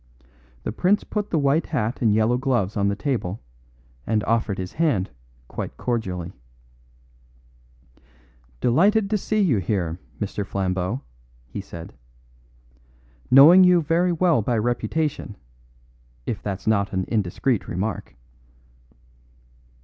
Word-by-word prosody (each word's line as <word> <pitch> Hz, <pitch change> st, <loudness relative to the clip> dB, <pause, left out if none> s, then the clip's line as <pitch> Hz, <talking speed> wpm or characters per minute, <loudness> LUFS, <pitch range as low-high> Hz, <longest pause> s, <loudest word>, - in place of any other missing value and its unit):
The -, -, -3 dB
prince 185 Hz, -, +2 dB
put 210 Hz, -1 st, -3 dB
the 165 Hz, -, 0 dB
white 145 Hz, +2 st, +2 dB
hat 125 Hz, -5 st, -2 dB
and 115 Hz, -3 st, +3 dB
yellow 110 Hz, +3 st, +3 dB
gloves 125 Hz, -6 st, 0 dB
on 100 Hz, -1 st, +1 dB
the 100 Hz, -, 0 dB
table 110 Hz, -7 st, -2 dB, 0.7 s
and 110 Hz, -1 st, +1 dB
offered 110 Hz, -3 st, 0 dB
his 90 Hz, -1 st, -5 dB
hand 145 Hz, -, 0 dB, 0.4 s
quite -, -, -6 dB
cordially. 95 Hz, -7 st, -3 dB, 2.3 s
"Delighted 195 Hz, -, +3 dB
to 215 Hz, -, +3 dB
see 215 Hz, +2 st, 0 dB
you 145 Hz, -, +3 dB
here, 90 Hz, -3 st, -2 dB, 0.2 s
Mr. 105 Hz, 0 st, -3 dB
Flambeau," 95 Hz, +3 st, -2 dB, 0.4 s
he 65 Hz, +11 st, -6 dB
said. 85 Hz, -6 st, -10 dB, 1.4 s
"Knowing 155 Hz, +8 st, +9 dB
you 180 Hz, -1 st, +6 dB
very 170 Hz, +3 st, +1 dB
well 170 Hz, -6 st, +2 dB
by 120 Hz, +2 st, 0 dB
reputation, 120 Hz, +2 st, -1 dB, 0.9 s
if 100 Hz, -, -3 dB
that's 100 Hz, -1 st, -5 dB
not 100 Hz, -2 st, +1 dB
an 95 Hz, -1 st, -1 dB
indiscreet 110 Hz, +3 st, 0 dB
remark." 100 Hz, -4 st, -4 dB
115 Hz, 120 wpm, -23 LUFS, 100-150 Hz, 2.3 s, Knowing